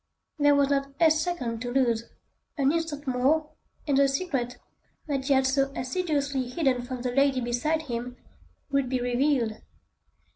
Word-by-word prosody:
There 290 Hz, 0 st, +5 dB
was 280 Hz, 0 st, +3 dB
not 275 Hz, 0 st, 0 dB
a 325 Hz, -2 st, +6 dB
second 305 Hz, -8 st, -1 dB
to 245 Hz, -, -3 dB
lose; 235 Hz, -3 st, +1 dB, 0.5 s
an 275 Hz, -1 st, +3 dB
instant 320 Hz, -3 st, -3 dB
more, 275 Hz, +5 st, +1 dB, 0.4 s
and 280 Hz, -2 st, +3 dB
the 280 Hz, -, +5 dB
secret, 270 Hz, -4 st, -2 dB, 0.5 s
that 275 Hz, -3 st, -2 dB
he 280 Hz, -, +4 dB
had 265 Hz, 0 st, +3 dB
so 275 Hz, +1 st, +1 dB
assiduously 280 Hz, -3 st, -1 dB
hidden 260 Hz, -3 st, +1 dB
from 245 Hz, 0 st, -6 dB
the 250 Hz, -, -1 dB
lady 275 Hz, 0 st, +3 dB
beside 250 Hz, +7 st, -1 dB
him, 245 Hz, -2 st, -5 dB, 0.5 s
would 275 Hz, -2 st, +1 dB
be 255 Hz, 0 st, 0 dB
revealed. 245 Hz, -2 st, 0 dB
270 Hz, 155 wpm, -27 LUFS, 250-290 Hz, 0.5 s, a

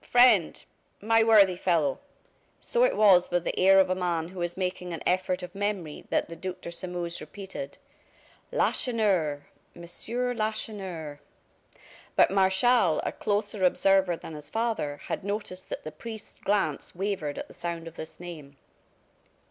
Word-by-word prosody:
friend, 245 Hz, -8 st, +4 dB, 0.4 s
my 225 Hz, +2 st, +4 dB
worthy 205 Hz, -5 st, +6 dB
fellow!" 165 Hz, -6 st, +1 dB, 0.6 s
So -, -, +1 dB
it -, -, +2 dB
was 190 Hz, -4 st, +6 dB
with 175 Hz, -1 st, 0 dB
the -, -, -2 dB
air 195 Hz, +1 st, +7 dB
of 190 Hz, -, +5 dB
a 185 Hz, -, +1 dB
man 175 Hz, -3 st, -1 dB
who 185 Hz, -1 st, -7 dB
is 175 Hz, +1 st, -2 dB
making 180 Hz, -1 st, -3 dB
an 165 Hz, -, -6 dB
effort 185 Hz, 0 st, 0 dB
of 180 Hz, 0 st, -7 dB
memory 195 Hz, -6 st, -3 dB
that -, -, +1 dB
the 165 Hz, -, -8 dB
Duc 185 Hz, +2 st, -6 dB
de 170 Hz, -, -6 dB
Sairmeuse 175 Hz, -1 st, -4 dB
repeated: 190 Hz, -8 st, -8 dB, 0.7 s
"Lacheneur 200 Hz, -, +1 dB, 0.3 s
Monsieur 235 Hz, +9 st, -2 dB
Lacheneur 200 Hz, -9 st, -4 dB, 0.5 s
" -, -, -23 dB
But -, -, +5 dB
Martial, 190 Hz, 0 st, +3 dB
a -, -, 0 dB
closer 205 Hz, -1 st, -2 dB
observer 185 Hz, -1 st, +3 dB
than 165 Hz, -, -9 dB
his 150 Hz, -1 st, -9 dB
father, 220 Hz, -10 st, -1 dB
had -, -, -4 dB
noticed 200 Hz, -2 st, -5 dB
that -, -, -5 dB
the 155 Hz, -, -6 dB
priest's 220 Hz, +7 st, -9 dB
glance 195 Hz, -9 st, -1 dB
wavered 180 Hz, -6 st, -2 dB
at -, -, -5 dB
the -, -, -14 dB
sound 170 Hz, -1 st, -5 dB
of 165 Hz, -, -9 dB
this 160 Hz, -1 st, -9 dB
name. 155 Hz, -6 st, -9 dB
185 Hz, 155 wpm, -27 LUFS, 170-205 Hz, 0.7 s, air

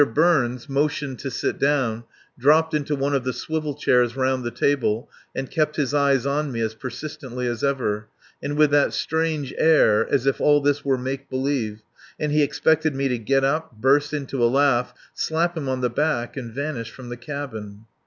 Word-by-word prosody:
Burns 135 Hz, -7 st, +2 dB
motioned 140 Hz, -1 st, -1 dB
to 135 Hz, -, -4 dB
sit 125 Hz, -, -2 dB
down, 130 Hz, -5 st, +1 dB, 0.3 s
dropped 155 Hz, +5 st, +3 dB
into 150 Hz, 0 st, 0 dB
one 140 Hz, +1 st, -1 dB
of 135 Hz, -2 st, +1 dB
the 130 Hz, 0 st, -2 dB
swivel 155 Hz, -1 st, -3 dB
chairs 125 Hz, -4 st, +2 dB
round 130 Hz, -1 st, 0 dB
the 120 Hz, -, -2 dB
table, 120 Hz, -4 st, 0 dB, 0.3 s
and 135 Hz, -1 st, -4 dB
kept 155 Hz, -1 st, 0 dB
his 145 Hz, -2 st, -1 dB
eyes 140 Hz, -2 st, +3 dB
on 145 Hz, +1 st, 0 dB
me 115 Hz, -, -4 dB
as 110 Hz, -1 st, -1 dB
persistently 130 Hz, +1 st, -6 dB
as 120 Hz, -2 st, -3 dB
ever, 110 Hz, -7 st, -1 dB, 0.3 s
and 145 Hz, +1 st, -3 dB
with 150 Hz, -1 st, +5 dB
that 145 Hz, 0 st, +3 dB
strange 160 Hz, -3 st, -1 dB
air 130 Hz, -9 st, +4 dB
as 130 Hz, -, +2 dB
if 135 Hz, -, +1 dB
all 145 Hz, 0 st, +5 dB
this 145 Hz, 0 st, +1 dB
were 135 Hz, -2 st, +1 dB
make 130 Hz, +2 st, -5 dB
believe 130 Hz, -6 st, -2 dB, 0.4 s
and 150 Hz, -1 st, -1 dB
he 150 Hz, +1 st, +3 dB
expected 155 Hz, +1 st, +2 dB
me 135 Hz, 0 st, 0 dB
to 125 Hz, -2 st, -1 dB
get 135 Hz, +4 st, +1 dB
up, 155 Hz, +1 st, 0 dB
burst 145 Hz, +4 st, +3 dB
into 140 Hz, -4 st, -2 dB
a 120 Hz, -, +5 dB
laugh, 135 Hz, -2 st, +2 dB, 0.2 s
slap 170 Hz, +2 st, 0 dB
him 145 Hz, -5 st, -3 dB
on 130 Hz, -1 st, -1 dB
the 125 Hz, -, +1 dB
back, 120 Hz, -3 st, -1 dB
and 125 Hz, -4 st, -6 dB
vanish 140 Hz, -5 st, -3 dB
from 125 Hz, -2 st, -11 dB
the 120 Hz, -, -6 dB
cabin. 115 Hz, -6 st, -7 dB
135 Hz, 195 wpm, -23 LUFS, 125-150 Hz, 0.4 s, with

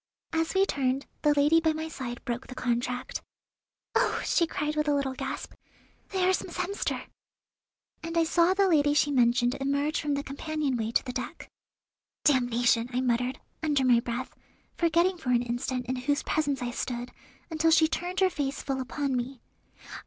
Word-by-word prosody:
As 325 Hz, +2 st, 0 dB
we 385 Hz, +1 st, +5 dB
turned, 270 Hz, -5 st, 0 dB, 0.2 s
the 295 Hz, -, +4 dB
lady 295 Hz, +3 st, +5 dB
by 320 Hz, -1 st, +2 dB
my 315 Hz, +1 st, -4 dB
side 250 Hz, -6 st, -6 dB
broke 240 Hz, +1 st, -3 dB
the 255 Hz, -, -9 dB
contract. 250 Hz, 0 st, -2 dB, 0.7 s
"Oh!" -, -, +2 dB
she 335 Hz, -, +2 dB
cried 300 Hz, -1 st, -2 dB
with 300 Hz, 0 st, 0 dB
a 290 Hz, -, +3 dB
little 275 Hz, -2 st, 0 dB
gasp, -, -, -5 dB, 0.6 s
"there 375 Hz, -2 st, +1 dB
is 375 Hz, -, +2 dB
Miss -, -, -8 dB
Hemster!" 400 Hz, -, -2 dB, 1.0 s
and 330 Hz, +1 st, -4 dB
I 335 Hz, -, +5 dB
saw 340 Hz, +3 st, +3 dB
the 395 Hz, 0 st, +4 dB
lady 295 Hz, -4 st, +3 dB
she 290 Hz, 0 st, +3 dB
mentioned 245 Hz, -1 st, +3 dB
emerge 280 Hz, +3 st, 0 dB
from 290 Hz, -1 st, 0 dB
the 280 Hz, -, -2 dB
companion 285 Hz, 0 st, -2 dB
way 225 Hz, -2 st, -1 dB
to -, -, +1 dB
the 250 Hz, -, -4 dB
deck. 255 Hz, -, -6 dB, 0.7 s
"Damnation!" 245 Hz, -3 st, +3 dB
I 250 Hz, +1 st, 0 dB
muttered, 250 Hz, +1 st, 0 dB, 0.2 s
under 290 Hz, -4 st, +2 dB
my 245 Hz, -2 st, +6 dB
breath, 240 Hz, +2 st, -4 dB, 0.4 s
forgetting 340 Hz, +2 st, +2 dB
for 270 Hz, -, -4 dB
an 245 Hz, -1 st, +3 dB
instant 245 Hz, +1 st, -2 dB
in 255 Hz, +1 st, -2 dB
whose 285 Hz, +4 st, 0 dB
presence 285 Hz, -4 st, 0 dB
I 240 Hz, -, -2 dB
stood, 245 Hz, 0 st, -4 dB, 0.4 s
until 320 Hz, 0 st, +2 dB
she 320 Hz, 0 st, +6 dB
turned 360 Hz, +3 st, -3 dB
her 380 Hz, -, +5 dB
face 280 Hz, -4 st, -2 dB
full 270 Hz, -1 st, -2 dB
upon 270 Hz, +1 st, -2 dB
me. 250 Hz, +1 st, -3 dB
280 Hz, 180 wpm, -28 LUFS, 250-315 Hz, 1.0 s, my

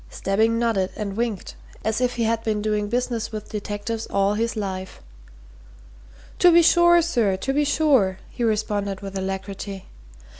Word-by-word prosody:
Stebbing 220 Hz, +4 st, +1 dB
nodded 225 Hz, -5 st, +1 dB
and 200 Hz, -2 st, -4 dB
winked, 225 Hz, -4 st, -3 dB, 0.3 s
as 220 Hz, +2 st, 0 dB
if 250 Hz, -1 st, +1 dB
he 235 Hz, -, 0 dB
had 225 Hz, 0 st, 0 dB
been 215 Hz, -2 st, 0 dB
doing 210 Hz, 0 st, -1 dB
business 240 Hz, -1 st, -2 dB
with 215 Hz, -1 st, -7 dB
detectives 210 Hz, +2 st, -4 dB
all 200 Hz, +1 st, +1 dB
his 230 Hz, +3 st, -1 dB
life. 190 Hz, -3 st, -5 dB, 1.4 s
"To 355 Hz, -, +7 dB
be 340 Hz, 0 st, +6 dB
sure, 345 Hz, 0 st, +5 dB
sir, 230 Hz, -, +1 dB
to 270 Hz, +7 st, -2 dB
be 295 Hz, +1 st, +2 dB
sure!" 275 Hz, -, +2 dB
he 240 Hz, -, -4 dB
responded 205 Hz, -3 st, -1 dB
with 195 Hz, -1 st, -7 dB
alacrity. 195 Hz, 0 st, -5 dB
215 Hz, 155 wpm, -23 LUFS, 200-240 Hz, 1.4 s, To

